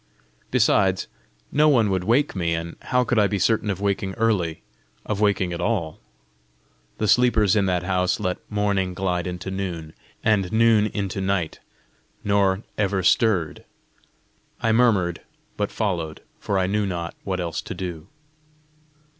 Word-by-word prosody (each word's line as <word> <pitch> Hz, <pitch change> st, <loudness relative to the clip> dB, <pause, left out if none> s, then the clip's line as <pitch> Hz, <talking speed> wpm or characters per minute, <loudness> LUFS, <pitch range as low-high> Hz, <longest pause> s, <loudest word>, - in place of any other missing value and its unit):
Besides, 95 Hz, -1 st, +2 dB, 0.5 s
no 150 Hz, +1 st, +4 dB
one 115 Hz, -8 st, +3 dB
would 95 Hz, -1 st, 0 dB
wake 125 Hz, +6 st, +2 dB
me, 85 Hz, -3 st, 0 dB
and 85 Hz, +1 st, -5 dB
how 125 Hz, -1 st, +1 dB
could 125 Hz, -2 st, +1 dB
I 105 Hz, -, +4 dB
be 100 Hz, -, -1 dB
certain 105 Hz, +1 st, +1 dB
of 95 Hz, -2 st, -2 dB
waking 100 Hz, -1 st, -1 dB
early 100 Hz, -8 st, 0 dB, 0.4 s
of 105 Hz, -1 st, -2 dB
waking 95 Hz, -4 st, +1 dB
at 85 Hz, -, -4 dB
all? 95 Hz, -9 st, -1 dB, 1.0 s
the 110 Hz, -, -1 dB
sleepers 110 Hz, -4 st, +4 dB
in 100 Hz, -2 st, +2 dB
that 90 Hz, -1 st, 0 dB
house 90 Hz, 0 st, 0 dB
let 90 Hz, -3 st, -2 dB
morning 100 Hz, -3 st, 0 dB
glide 90 Hz, -2 st, -1 dB
into 90 Hz, +1 st, -5 dB
noon, 85 Hz, -5 st, -4 dB, 0.3 s
and 105 Hz, -4 st, +2 dB
noon 110 Hz, -1 st, +4 dB
into 100 Hz, -3 st, -3 dB
night, 95 Hz, -4 st, -1 dB, 0.6 s
nor 100 Hz, 0 st, +2 dB, 0.2 s
ever 95 Hz, -2 st, +1 dB
stirred! 90 Hz, -4 st, +2 dB, 1.0 s
I 115 Hz, -, +1 dB
murmured, 105 Hz, -8 st, +2 dB, 0.3 s
but 105 Hz, -1 st, -1 dB
followed, 85 Hz, -8 st, -3 dB, 0.2 s
for 100 Hz, -, -1 dB
I 95 Hz, -, +2 dB
knew 105 Hz, +2 st, 0 dB
not 85 Hz, -2 st, -4 dB
what 95 Hz, -1 st, -2 dB
else 85 Hz, -2 st, -3 dB
to -, -, -7 dB
do. 90 Hz, -3 st, -6 dB
95 Hz, 150 wpm, -23 LUFS, 90-105 Hz, 1.0 s, no